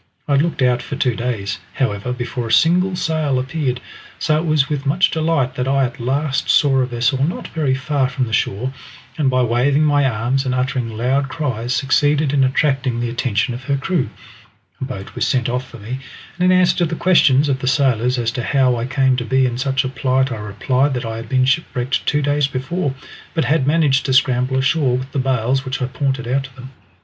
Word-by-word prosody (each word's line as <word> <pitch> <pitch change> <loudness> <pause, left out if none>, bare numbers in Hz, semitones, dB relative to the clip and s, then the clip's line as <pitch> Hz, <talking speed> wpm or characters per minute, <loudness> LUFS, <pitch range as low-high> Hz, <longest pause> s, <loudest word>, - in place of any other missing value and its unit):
I - - -2
had 140 0 +4
looked 160 -4 -1
out 125 -1 +2
for 140 - -6
two 125 -3 0
days, 110 -5 -3 0.2
however, 110 -2 -1
before 120 -1 -4
a - - -4
single 180 +8 +3
sail 155 -5 0
appeared, 130 -1 -2 0.4
so 155 - +1
it 165 - -3
was 155 -3 +2
with 145 -2 -3
much 170 +7 +3
delight 155 -5 0
that 125 -1 -3
I 135 0 +2
at 125 0 -3
last 135 +3 -1
saw 135 -2 +4
a 130 - +1
vessel 125 +2 0
not 165 +5 -3
very 145 -5 0
far 135 -1 0
from 130 -2 -1
the 110 - -7
shore, 125 +8 -1 0.5
and 140 -3 +3
by 130 -1 +2
waving 125 +5 +2
my 145 -2 +3
arms 125 +4 -1
and 130 -1 -1
uttering 125 -3 -2
loud 135 +4 0
cries 130 -3 -2
succeeded 145 +1 +2
in 140 -2 +3
attracting 130 -2 +1
the 120 -1 -2
attention 120 -2 -1
of 125 +2 -8
her 140 +1 0
crew. 165 0 -1 0.7
A - - -1
boat 100 -7 -8
was - - -1
sent 125 -2 +1
off 125 +1 -3
to 120 - -11
me, 120 +5 -6 0.4
and 180 +1 +4
in 185 - +5
answer 180 - +3
to 175 - +2
the 165 - -3
questions 150 -6 +4
of 135 -2 0
the 130 - -4
sailors 125 -2 +2
as 115 -2 0
to 125 - -4
how 130 0 +2
I 115 +1 -3
came 130 -1 +2
to 120 - -2
be 130 +2 +2
in 120 -1 -2
such 135 0 0
a - - 0
plight, 130 0 0
I 115 - -3
replied 125 +7 0
that 125 -1 -3
I 115 0 -4
had 115 -1 -8
been 130 -1 +2
shipwrecked 130 -3 -1
two 150 0 +1
days 145 0 +1
before, 135 +3 -3 0.4
but 160 -4 +1
had 140 +1 +1
managed 145 -3 +2
to 130 - +1
scramble 130 0 +2
ashore 135 -1 +2
with 130 +2 -6
the 140 - -2
bales 130 0 0
which 135 0 -4
I 125 - 0
pointed 130 -1 -2
out 135 +2 0
to 135 -1 -14
them. 130 0 -11
130 Hz, 225 wpm, -19 LUFS, 125-145 Hz, 0.7 s, in